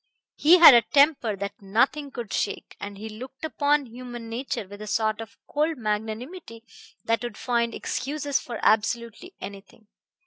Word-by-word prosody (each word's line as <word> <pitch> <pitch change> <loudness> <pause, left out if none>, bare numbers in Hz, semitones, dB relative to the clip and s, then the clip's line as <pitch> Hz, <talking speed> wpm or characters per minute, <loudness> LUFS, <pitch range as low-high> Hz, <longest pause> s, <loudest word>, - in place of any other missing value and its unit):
He 335 +5 +6
had 335 -5 +11
a 235 - +7
temper 275 -3 +3
that 200 +1 -6
nothing 260 +9 +1
could 240 -6 -7
shake, 205 - -3
and 200 0 -7
he 215 +2 -7
looked 255 +7 -8
upon 295 -2 +1
human 240 -1 -9
nature 230 -3 -4
with 205 +2 -11
a 215 - -7
sort 215 +1 0
of 225 -1 -11
cold 305 +1 -1
magnanimity 225 - -4 0.4
that 230 0 +1
would 240 -3 -6
find 235 -2 0
excuses 285 0 -2
for 235 -2 -7
absolutely 235 - 0
anything. 200 +2 -11
235 Hz, 160 wpm, -25 LUFS, 215-280 Hz, 0.4 s, had